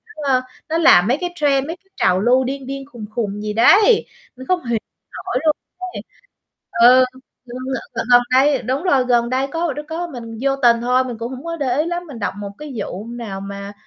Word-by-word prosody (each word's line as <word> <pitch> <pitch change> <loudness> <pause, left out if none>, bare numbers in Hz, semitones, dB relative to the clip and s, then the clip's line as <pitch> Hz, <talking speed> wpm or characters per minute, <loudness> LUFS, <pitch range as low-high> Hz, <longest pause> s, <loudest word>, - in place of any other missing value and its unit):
ơ, 275 -4 +1 0.3
nó 320 - 0
làm 215 - +6
mấy 255 +4 +2
cái 355 - -1
trend, 280 -3 +1
mấy 330 - -5
cái 385 +2 -38
trào 180 - +2
lưu 245 +5 +3
điên 265 0 -5
điên 275 0 -5
khùng 230 -3 -8
khùng 210 -3 -2
gì 210 0 -3
đấy, 410 - +5 0.3
mình 260 +1 -11
không 365 -4 0
hiểu 235 -2 0 0.5
nổi - - -1
luôn 305 -1 +4 0.4
ấy. - - -5 0.9
Ừ, 255 +1 +6 0.4
Gần 245 0 -8 0.5
gần 245 0 +7
đây 270 +1 +4
đúng 265 +5 -2
rồi, 275 -9 +3
gần 240 -1 +2
đây 260 +2 0
có 330 +1 -2 0.2
có 340 +2 -3
mình 230 -7 -8
vô 275 0 +1
tình 240 -3 +3
thôi, 250 +2 +2
mình 245 -3 -6
cũng 235 +2 -4
hổng 260 +1 -8
có 335 0 -3
để 260 -4 -1
ý 310 - +2
lắm, 345 +1 -3
mình 270 -6 -9
đọc 205 - -2
một 205 -1 -6
cái 300 -2 -8
vụ 200 0 -5
nào 230 -5 -6
mà 200 0 -7
255 Hz, 215 wpm, -19 LUFS, 235-295 Hz, 0.9 s, gần